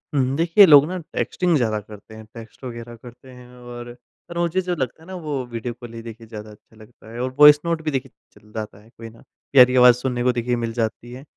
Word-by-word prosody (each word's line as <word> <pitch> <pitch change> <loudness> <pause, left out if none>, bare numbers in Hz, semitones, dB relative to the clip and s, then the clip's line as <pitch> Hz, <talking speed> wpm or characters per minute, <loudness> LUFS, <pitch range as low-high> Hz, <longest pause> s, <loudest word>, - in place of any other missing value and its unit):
हुँ, 140 - +3
हुँ। 135 - -2
देखिए, 170 +5 +6
लोग 145 -4 +7
ना 185 +2 -4 0.2
टेक्स्टिंग 180 -2 0
ज़्यादा 110 -5 -1
करते 105 +1 -14
हैं, 110 0 -12
टेक्स्ट 115 +2 -13
वग़ैरह 120 -1 -8
करते 120 +3 -15
हैं 125 -1 -14
और 120 0 -10 0.3
और 170 - -7
मुझे 170 +2 0
जो 180 -1 -3
लगता 130 0 -4
है - - -17
ना, 190 - -9
वो 150 -7 -4
वीडियो 120 +1 -5
कॉल 120 0 -12
ही 115 - -8
देखिए 115 0 -11
ज़्यादा 110 -1 -9
अच्छा 105 +1 -21
लगता 110 0 -17
है 120 - -8
और 130 +1 -2
वॉइस 150 0 +9
नोट 170 -1 -1
भी 155 - -2
देखिए 135 -2 -4 0.2
चल 105 - -21
जाता 110 -2 -6
है, 110 - -21
कोई 115 -1 -12
ना, 115 +1 -19 0.3
प्यारी 125 -2 +6
आवाज़ 125 -1 +7
सुनने 125 -1 -3
को 125 - +3
देखिए 120 0 -2
मिल 115 -1 -4
जाती 115 +1 -4
है। 130 +2 -10
120 Hz, 250 wpm, -21 LUFS, 115-140 Hz, 0.3 s, वॉइस